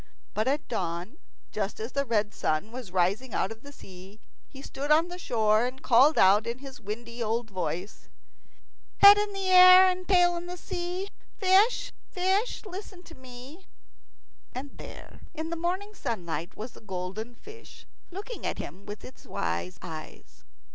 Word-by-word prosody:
But 215 Hz, +3 st, -1 dB
at 285 Hz, +3 st, 0 dB
dawn, 180 Hz, -, -4 dB, 0.3 s
just 205 Hz, -1 st, -3 dB
as 225 Hz, +3 st, -5 dB
the 280 Hz, 0 st, -1 dB
red 210 Hz, -2 st, 0 dB
sun 155 Hz, +8 st, -1 dB
was 245 Hz, -4 st, -7 dB
rising 195 Hz, +7 st, 0 dB
out 190 Hz, -, 0 dB
of 225 Hz, 0 st, -9 dB
the 285 Hz, -, -12 dB
sea, 190 Hz, -4 st, -13 dB, 0.3 s
he 270 Hz, 0 st, -12 dB
stood 285 Hz, +2 st, -5 dB
on 320 Hz, +3 st, +4 dB
the 355 Hz, +1 st, -7 dB
shore, 220 Hz, -6 st, +2 dB
and 260 Hz, +1 st, -9 dB
called 265 Hz, +6 st, +5 dB
out 200 Hz, +4 st, +5 dB
in 235 Hz, +1 st, -3 dB
his 270 Hz, 0 st, -11 dB
windy 235 Hz, +3 st, -6 dB
old 225 Hz, 0 st, -1 dB
voice, 185 Hz, +1 st, -5 dB, 0.9 s
"Head 405 Hz, +1 st, +9 dB
in 415 Hz, -1 st, -2 dB
air 370 Hz, -1 st, +8 dB
and 365 Hz, 0 st, -6 dB
tail 355 Hz, -2 st, +4 dB
in 350 Hz, +1 st, -6 dB
sea, 360 Hz, +2 st, -4 dB, 0.3 s
Fish, 395 Hz, +4 st, +3 dB, 0.2 s
fish, 385 Hz, +6 st, 0 dB
listen 380 Hz, -2 st, -9 dB
to 340 Hz, -, -14 dB
me." 260 Hz, +6 st, -12 dB, 0.9 s
And 275 Hz, +2 st, -7 dB
there -, -, -11 dB, 0.2 s
in 320 Hz, +1 st, -4 dB
the -, -, -1 dB
morning 370 Hz, +5 st, -3 dB
sunlight 175 Hz, -, -4 dB
was 225 Hz, +3 st, -6 dB
the -, -, -16 dB
golden 195 Hz, +4 st, -6 dB
fish, 435 Hz, -, -14 dB, 0.2 s
looking 410 Hz, +6 st, -7 dB
at -, -, -2 dB
him 200 Hz, +2 st, -8 dB
with 205 Hz, 0 st, -8 dB
its 260 Hz, -, -14 dB
wise 85 Hz, +1 st, -3 dB
eyes. 160 Hz, -3 st, -10 dB
255 Hz, 160 wpm, -28 LUFS, -, 0.9 s, Head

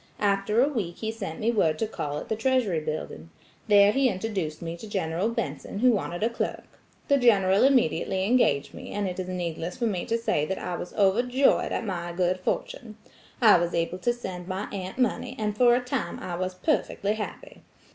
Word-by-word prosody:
After 200 Hz, +2 st, +1 dB
a -, -, +3 dB
week 210 Hz, -12 st, -3 dB
he 220 Hz, 0 st, -3 dB
sent 195 Hz, -8 st, -6 dB
me 225 Hz, +2 st, +1 dB
word 165 Hz, -9 st, +2 dB
to 220 Hz, -, 0 dB
call 145 Hz, -9 st, -4 dB
at -, -, -6 dB
the 220 Hz, -, -1 dB
Treasury 225 Hz, -7 st, +1 dB
Building. 155 Hz, -, -5 dB, 0.4 s
There 205 Hz, -1 st, +6 dB
he 265 Hz, +2 st, +3 dB
introduced 190 Hz, -6 st, -3 dB
me 165 Hz, 0 st, -5 dB
to 215 Hz, +5 st, -10 dB
General 180 Hz, +1 st, -1 dB
Benson 230 Hz, -, -4 dB
who 250 Hz, +4 st, +5 dB
wanted 195 Hz, -3 st, -2 dB
a 225 Hz, -, +3 dB
clerk. 235 Hz, -, -3 dB, 0.4 s
The 280 Hz, -1 st, +4 dB
General 200 Hz, -6 st, +4 dB
immediately 240 Hz, -7 st, +2 dB
engaged 195 Hz, -, +2 dB
me, -, -, -9 dB
and 205 Hz, -1 st, -1 dB
it 180 Hz, 0 st, -5 dB
is 185 Hz, -, -3 dB
needless 175 Hz, -1 st, -4 dB
for 240 Hz, -, -1 dB
me 190 Hz, -6 st, -1 dB
to 230 Hz, -, +1 dB
say 230 Hz, -10 st, 0 dB
that 190 Hz, +5 st, -2 dB
I 180 Hz, -, -4 dB
was 175 Hz, -, -7 dB
overjoyed 245 Hz, +7 st, +3 dB
at -, -, -2 dB
my 175 Hz, -3 st, -4 dB
good 180 Hz, +1 st, 0 dB
fortune. 215 Hz, +4 st, -4 dB, 0.5 s
I 215 Hz, -5 st, +8 dB
was 170 Hz, 0 st, -1 dB
able 170 Hz, +2 st, -1 dB
to 240 Hz, -, +1 dB
send 185 Hz, -7 st, -6 dB
my 190 Hz, +2 st, -3 dB
aunt 190 Hz, +1 st, -5 dB
money, 250 Hz, -3 st, 0 dB
and 210 Hz, -1 st, -2 dB
for 240 Hz, +1 st, +5 dB
a -, -, +2 dB
time 250 Hz, -1 st, -3 dB
I 180 Hz, -, -6 dB
was 185 Hz, +1 st, -3 dB
perfectly 205 Hz, -, 0 dB
happy. 215 Hz, -1 st, -7 dB
200 Hz, 205 wpm, -26 LUFS, 180-230 Hz, 0.5 s, I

